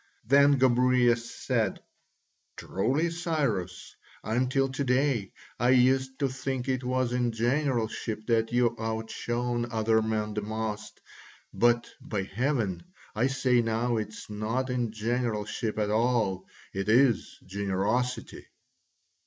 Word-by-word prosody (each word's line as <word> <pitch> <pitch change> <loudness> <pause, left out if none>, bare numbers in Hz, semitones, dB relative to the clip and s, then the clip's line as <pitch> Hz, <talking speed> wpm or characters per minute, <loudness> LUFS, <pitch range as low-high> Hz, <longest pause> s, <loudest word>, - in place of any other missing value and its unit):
Then 140 +3 +5
Gobryas 125 -2 +3
said, - - -1 0.8
"Truly, 145 - 0
Cyrus, 140 - -2 0.3
until 130 +4 +1
to 135 +2 -2
day 125 -5 +1 0.3
I 120 - +3
used 130 +1 +3
to 140 - +1
think 135 -1 -4
it 130 -1 -1
was 130 -1 0
in 120 -1 +1
generalship 115 -3 -1
that 115 -1 +1
you 120 -1 +2
outshone 120 +2 -2
other 110 0 +2
men 110 -1 -1
the 105 - -2
most, 110 0 -5 0.5
but, 120 0 +3
by 100 -3 -3
heaven! 110 -2 -1 0.3
I 115 +4 +2
say 130 -2 +2
now 115 +1 0
it 110 - -1
is 110 - -10
not 110 +5 -2
in 120 -3 -1
generalship 110 -1 -2
at 105 -1 0
all, 110 -5 +1 0.3
it 95 +2 -2
is 120 -2 +3
generosity." 100 +6 -2
120 Hz, 120 wpm, -28 LUFS, 110-130 Hz, 0.8 s, Then